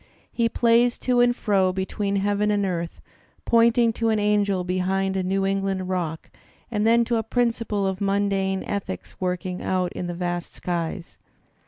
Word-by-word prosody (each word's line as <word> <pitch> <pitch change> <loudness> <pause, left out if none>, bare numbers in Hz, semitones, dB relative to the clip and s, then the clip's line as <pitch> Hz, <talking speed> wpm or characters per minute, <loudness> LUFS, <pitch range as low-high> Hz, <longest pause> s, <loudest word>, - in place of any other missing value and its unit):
He 230 -1 +1
plays 235 +1 +3
to 250 -1 +1
and 245 0 +4
fro 195 -5 +2
between 195 +2 -2
heaven 205 +1 +1
and 205 -1 +1
earth, 170 -2 -3 0.4
pointing 230 0 +4
to 225 0 0
an 220 - +2
angel 205 -2 +1
behind 190 +1 0
a 190 - +1
New 195 +1 0
England 195 -1 -1
rock 170 -4 -3 0.4
and 210 -1 +1
then 235 +1 +4
to 235 0 0
a - - +1
principle 230 -3 0
of 190 +1 -2
mundane 195 -1 0
ethics 195 -2 -5
work 180 -1 -1
ing 180 -1 -4
out 185 -1 -1
in 175 - -4
the 175 - -4
vast 175 -1 -3
skies. 170 0 -4
195 Hz, 170 wpm, -24 LUFS, 185-220 Hz, 0.4 s, and